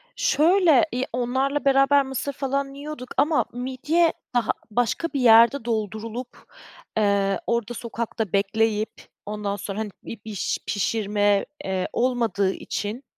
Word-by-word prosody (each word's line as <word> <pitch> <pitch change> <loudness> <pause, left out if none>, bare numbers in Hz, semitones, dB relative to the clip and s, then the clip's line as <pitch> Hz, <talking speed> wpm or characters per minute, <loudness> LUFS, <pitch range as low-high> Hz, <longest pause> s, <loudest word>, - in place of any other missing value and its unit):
Şöyle, 345 - +4
iii, 245 - -2
ya, - - -2
onlarla 260 +4 0
beraber 275 0 +4
mısır 265 +1 -3
falan 275 0 -2
yiyorduk 285 -2 -8
ama 295 +3 +3
midye 265 +7 +1 0.2
daha 240 -2 +2 0.2
başka 245 +8 0
bir 280 - 0
yerde 235 +1 +6
doldurulup, 225 +2 -3 0.7
eee, 200 -2 +2
orda 235 0 -1
sokakta 230 -3 -4
bekleyip 215 +2 +1 0.3
ondan 205 -1 -3
sonra, 200 +1 -5
hani, 215 -2 -3
bi 230 - -8
biş 210 -4 -2
pişirme, 205 -1 +1 0.2
eee, 190 -1 -1
olmadığı 230 -6 +1
için 215 +6 -5
235 Hz, 130 wpm, -24 LUFS, 210-275 Hz, 0.7 s, yerde